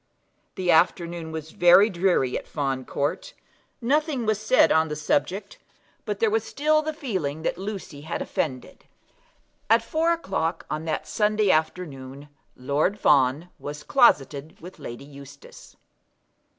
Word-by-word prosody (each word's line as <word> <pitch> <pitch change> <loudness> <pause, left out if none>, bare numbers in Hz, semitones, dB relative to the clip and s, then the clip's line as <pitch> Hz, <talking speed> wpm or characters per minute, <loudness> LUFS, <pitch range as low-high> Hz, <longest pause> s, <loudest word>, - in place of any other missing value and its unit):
The 185 -2 +1
afternoon 170 0 +1
was 160 0 -6
very 175 +4 +6
dreary 175 - +1
at - - -5
Fawn 135 -3 -2
Court. 155 - -3 0.5
Nothing 285 0 0
was 215 -1 0
said 220 +4 +4
on 160 0 +3
the 150 - -4
subject; 175 - -2 0.5
but - - -3
there 450 -2 +2
was 445 +1 +1
still 310 +2 +1
the 310 0 -3
feeling 185 - -4
that - - -1
Lucy 190 -7 -6
had 160 +3 -4
offended. 130 -5 -4 0.8
At 225 +1 +5
four 320 +7 +1
o'clock 185 - -2
on 155 +1 -3
that 160 - -3
Sunday 210 -2 +2
afternoon 145 -4 -3 0.3
Lord 145 +10 0
Fawn 140 +3 +3
was 150 +1 -7
closeted 150 - +2
with 180 +3 -12
Lady 120 +3 -8
Eustace. 140 -1 -14
170 Hz, 140 wpm, -25 LUFS, 145-215 Hz, 0.8 s, very